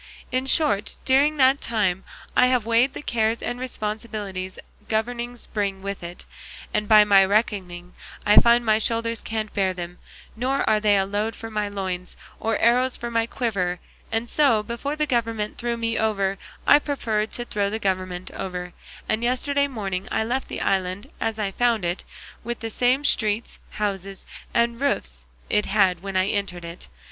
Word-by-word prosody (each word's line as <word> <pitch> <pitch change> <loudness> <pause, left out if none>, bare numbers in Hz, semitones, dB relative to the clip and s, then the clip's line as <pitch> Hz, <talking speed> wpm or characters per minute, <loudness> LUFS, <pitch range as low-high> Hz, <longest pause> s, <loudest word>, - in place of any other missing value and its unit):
In 255 +1 0
short, 215 -9 +1
during 285 +3 +4
that 265 +1 +5
time 195 -5 0 0.3
I 250 - +6
have 250 -3 +2
weighed 235 +4 +3
the - - -6
cares 225 -2 0
and 245 0 -3
responsibilities 210 -6 -4 0.3
governing 240 +2 -2 0.2
brings 200 -3 -1
with 200 0 -4
it, 175 +1 -8 0.5
and 210 -1 0
by 215 -1 +8
my 200 -2 +6
reckoning 190 -4 -1 0.3
I 210 - +5
find 235 0 +6
my 215 -1 +4
shoulders 230 0 0
can't 220 -1 -3
bear 190 -2 +1
them, 175 0 -7 0.4
nor 260 +4 0
are 215 - +4
they 210 -1 +4
a 195 - +2
load 205 +2 -2
for 225 0 -8
my 210 -1 -1
loins 185 -3 -4 0.2
or 225 0 0
arrows 250 +2 +3
for 235 0 -5
my 230 0 +1
quiver; 195 -8 -1 0.3
and 225 +1 -1
so, 235 -6 +3
before 235 +6 -3
the 305 0 +1
government 230 -5 -1
threw 235 0 -1
me 230 0 -1
over 200 -3 0 0.3
I 290 - +7
preferred 225 -8 -1
to 240 - -3
throw 205 -4 0
the 215 - -2
government 185 -3 -2
over; 180 -1 -5 0.3
and 215 +1 0
yesterday 280 +3 +1
morning 195 -8 -4
I - - +1
left 250 +4 -2
the - - -5
island 185 +1 -1
as 225 -1 -1
I 205 -2 -1
found 230 -2 +1
it, 175 +2 -2 0.4
with 240 +1 -4
the 225 -1 -4
same 255 +5 +2
streets, 215 -3 +1
houses, 195 -2 -3 0.3
and 235 +1 +1
roofs 280 0 -1 0.2
it 210 0 +1
had 195 -4 +3
when 195 -1 -3
I 185 - +3
entered 195 -4 -2
it. 170 +1 -8
215 Hz, 175 wpm, -24 LUFS, 195-235 Hz, 0.5 s, by